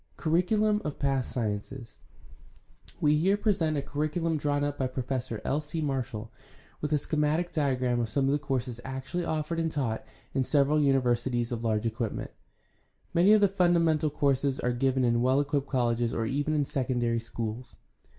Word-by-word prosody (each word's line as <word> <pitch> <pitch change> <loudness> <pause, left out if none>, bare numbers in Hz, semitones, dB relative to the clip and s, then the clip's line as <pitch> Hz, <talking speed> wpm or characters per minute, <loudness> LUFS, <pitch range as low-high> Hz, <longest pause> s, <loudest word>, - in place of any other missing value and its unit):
Curriculum 210 +6 +2
of 150 - -3
social 135 -2 +1
sciences. 115 0 -4 0.5
— - - -20
We 150 0 +4
here 195 +5 +3
present 185 -8 +1
a 140 - -1
curricu 150 +4 -2
lum 165 -1 +1
drawn 145 -1 0
up 145 0 -2
by 130 - +1
Professor 130 -3 -3
L. 145 +3 0
C. 155 +2 -4
Marshall, 130 -7 -3 0.5
with 150 - -2
a 150 - +4
schematic 155 +4 0
diagram 130 -6 +1
of 115 -2 -1
some 135 +3 +1
of 135 - +2
the 145 - +1
courses 130 -4 -3
actually 135 +7 -4
offered 155 +1 -2
and 165 -1 0
taught 120 -7 -2 0.3
in 135 - +1
several 145 +2 +3
universities 125 -3 +1
of 120 -1 -3
large 110 -1 0
equipment. 115 -1 -3 0.8
Many 180 +5 +5
of 215 - +5
the 200 - +6
fim 180 -2 +2
damental 160 -2 +2
courses 140 -2 +1
are 125 - 0
given 130 +1 +1
in 120 -1 +2
well 130 +2 +3
equipped 145 -1 0
colleges 120 -3 0
or 115 - 0
even 145 +6 0
in 145 -1 +2
secondary 120 -4 0
schools. 115 +1 -6
140 Hz, 180 wpm, -28 LUFS, 120-155 Hz, 0.8 s, the